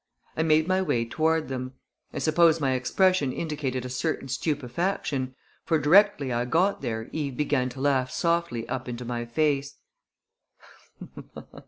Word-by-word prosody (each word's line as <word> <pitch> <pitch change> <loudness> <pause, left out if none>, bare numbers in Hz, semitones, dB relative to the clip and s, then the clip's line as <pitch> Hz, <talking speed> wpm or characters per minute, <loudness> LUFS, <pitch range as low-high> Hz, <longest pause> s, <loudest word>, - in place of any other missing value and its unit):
I - - 0
made 155 0 +3
my 185 0 +2
way 135 -10 0
toward 160 +5 0
them. 130 0 -5 0.4
I - - -8
suppose 165 0 +4
my 135 -3 +1
expression 140 +4 +2
indicated 135 -5 -3
a - - -5
certain 135 +1 -2
stupefaction, 140 -1 -2 0.3
for 165 - +2
directly 150 -3 +4
I 120 +1 0
got 175 +10 +1
there 110 0 -3
Eve 140 -5 -3
began 140 -4 +1
to 130 +1 -9
laugh 135 -2 +2
softly 170 -9 -1
up 130 -1 -4
into 120 0 -6
my 120 0 -3
face. 140 +2 0
140 Hz, 145 wpm, -26 LUFS, 125-160 Hz, 0.4 s, suppose